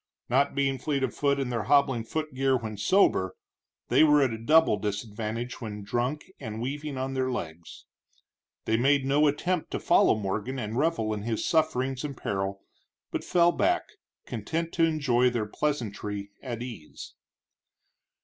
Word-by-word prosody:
Not 135 +3 +2
being 135 -2 +1
fleet 140 0 -1
of 130 - -1
foot 140 -1 +1
in 130 -2 -2
their 115 -4 -2
hobbling 135 -3 +3
footgear 135 -2 0
when 110 -3 -6
sober, 100 - +2 0.5
they - - +5
were 150 -2 +5
at 130 -4 +1
a - - -4
double 155 -1 +4
disadvantage 105 +4 -4
when 105 -3 -6
drunk 120 +8 -2
and 110 -4 -6
weaving 140 +3 -4
on 130 +1 -2
their 130 -1 0
legs. 85 -9 -6 0.8
They 110 - +2
made 135 +2 +3
no 145 +3 +4
attempt 160 +4 -1
to - - -3
follow - - +4
Morgan 105 +6 -3
and 110 -2 -4
revel 135 -7 +1
in 105 - -4
his 110 +1 -2
sufferings 135 -5 +1
and 140 -3 -5
peril, 95 0 -3 0.5
but - - -3
fell 175 -1 +4
back, 350 - +1 0.4
content 165 0 -3
to 165 - +4
enjoy 135 -6 +2
their 120 -3 -1
pleasantry 105 -6 -3
at 120 -3 -5
ease. 115 -12 -9
130 Hz, 160 wpm, -27 LUFS, 110-145 Hz, 0.8 s, they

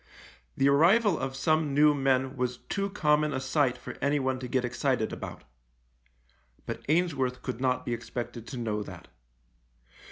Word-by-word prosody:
The 135 - +4
arrival 175 +7 +4
of 135 0 -3
some 155 0 +1
new 150 +1 +6
men 135 -1 +1
was 125 -1 -2
too 200 +8 -3
common 150 -6 +2
a - - -1
sight 135 -1 +1
for - - -9
anyone 135 -2 +1
to 130 - -5
get 125 0 0
excited 120 -1 0
about - - -7 0.6
— - - -37
but - - -5
Ainsworth 140 -7 +1
could 125 -2 -4
not 130 -1 0
be 120 - -1
expected 120 0 -6
to 130 - -6
know 110 -3 -2
that. 90 -4 -10
130 Hz, 160 wpm, -28 LUFS, 120-150 Hz, 0.6 s, new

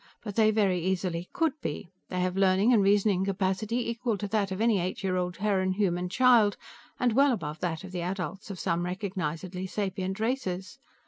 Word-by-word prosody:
But 205 -3 -6
they 220 -1 +5
very 200 -4 +2
easily 180 -2 -1
could 330 -5 +1
be. 160 +4 -5 0.2
They 180 -1 -2
have 180 0 0
learning 195 +4 +4
and 220 - +5
reasoning 200 -1 +3
capacity 200 +5 -1
equal 235 -1 -1
to 205 - -4
that 205 -2 0
of 190 - -3
any 225 -3 +3
eight 185 +4 -3
year 185 -1 0
old 180 0 -1
Terran 190 -1 +1
Human 180 -3 0
child, 235 -2 +4 0.4
and 245 -3 +2
well 275 +3 +5
above 155 -9 -3
that 165 -1 -2
of 190 - -9
the 180 -1 -3
adults 190 +3 -4
of 190 -3 -6
some 170 -2 0
recognizedly 185 -1 -3
sapient 190 -1 -3
races. 210 -6 -2
190 Hz, 190 wpm, -28 LUFS, 180-215 Hz, 0.4 s, they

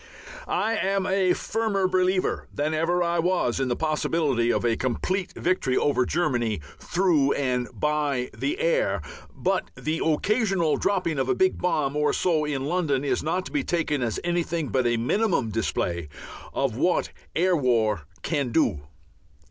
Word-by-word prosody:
I 225 0 0
am 195 -1 0
a 185 -1 +2
firmer 210 -3 0
believer 185 0 +1
than 150 +2 -1
ever 170 +3 +1
I 170 0 0
was 170 -8 +1
in 135 - 0
the 120 - 0
possibility 150 -5 +1
of - - 0
a 115 -1 +2
complete 180 - -2
victory 170 -8 0
over 135 -4 +2
Germany 120 - 0 0.2
through 170 -7 +2
and 125 -3 -1
by 150 -4 -1
the 315 +5 -2
air. - - +1 0.3
But - - -1
the 160 +2 -2
occasional 190 +1 +1
dropping 180 -6 0
of - - 0
a 390 - +3
big 375 0 +2
bomb 150 -6 0
or 150 0 +2
so 160 -4 +1
in 140 -3 -2
London 150 -4 0
is - - 0
not 180 +4 -1
to - - -8
be 290 -3 0
taken 160 - 0
as 115 -3 -1
anything 170 -3 -1
but 125 +3 +1
a 120 0 +2
minimum 165 - +1
display 85 -7 -2 0.4
of 135 -5 -1
what 175 +8 +1 0.3
air 180 +2 +3
war 110 - +1 0.2
can 145 -6 -1
do. 115 - +2
155 Hz, 160 wpm, -25 LUFS, 130-185 Hz, 0.4 s, a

